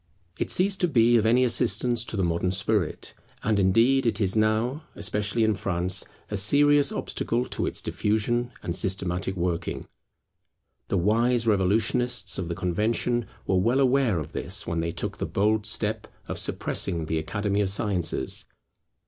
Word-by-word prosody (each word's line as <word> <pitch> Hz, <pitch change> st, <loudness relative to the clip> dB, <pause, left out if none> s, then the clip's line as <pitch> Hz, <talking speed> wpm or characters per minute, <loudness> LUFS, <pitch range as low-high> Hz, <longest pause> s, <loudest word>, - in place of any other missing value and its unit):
It -, -, -1 dB
ceased 190 Hz, +1 st, +2 dB
to 180 Hz, -, +3 dB
be 120 Hz, -5 st, +4 dB
of 110 Hz, -1 st, +2 dB
any 125 Hz, +3 st, +4 dB
assistance 120 Hz, -1 st, +2 dB
to 110 Hz, -, -4 dB
the 95 Hz, -, +1 dB
modern 85 Hz, +1 st, 0 dB
spirit; 95 Hz, -2 st, -1 dB, 0.3 s
and 105 Hz, -1 st, +1 dB
indeed 115 Hz, +7 st, +3 dB
it 110 Hz, -2 st, 0 dB
is 100 Hz, -1 st, +2 dB
now, 110 Hz, +6 st, +1 dB
especially 105 Hz, +3 st, -1 dB
in 110 Hz, -1 st, +3 dB
France, 95 Hz, -1 st, -1 dB, 0.3 s
a 105 Hz, -, -1 dB
serious 145 Hz, +7 st, +3 dB
obstacle 120 Hz, +2 st, -2 dB
to -, -, -2 dB
its -, -, -1 dB
diffusion 120 Hz, +3 st, -1 dB
and 85 Hz, -, -2 dB
systematic 95 Hz, 0 st, -2 dB
working. 85 Hz, -1 st, -3 dB, 1.0 s
The 100 Hz, -, 0 dB
wise 115 Hz, +6 st, +2 dB
revolutionists 110 Hz, +2 st, +1 dB
of 90 Hz, -, -3 dB
the 85 Hz, -, -3 dB
Convention 110 Hz, +5 st, 0 dB, 0.2 s
were 95 Hz, -, +2 dB
well 120 Hz, +7 st, +2 dB
aware 130 Hz, -6 st, +3 dB
of 75 Hz, -, -6 dB
this -, -, -2 dB
when 85 Hz, 0 st, -2 dB
they 85 Hz, 0 st, -1 dB
took -, -, -5 dB
the -, -, -2 dB
bold 105 Hz, +1 st, +1 dB
step 110 Hz, 0 st, -1 dB, 0.2 s
of -, -, -4 dB
suppressing 85 Hz, -2 st, -1 dB
the 80 Hz, 0 st, -1 dB
Academy 105 Hz, +5 st, -1 dB
of 100 Hz, -, 0 dB
Sciences. 95 Hz, -4 st, -1 dB
105 Hz, 160 wpm, -26 LUFS, 95-120 Hz, 1.0 s, be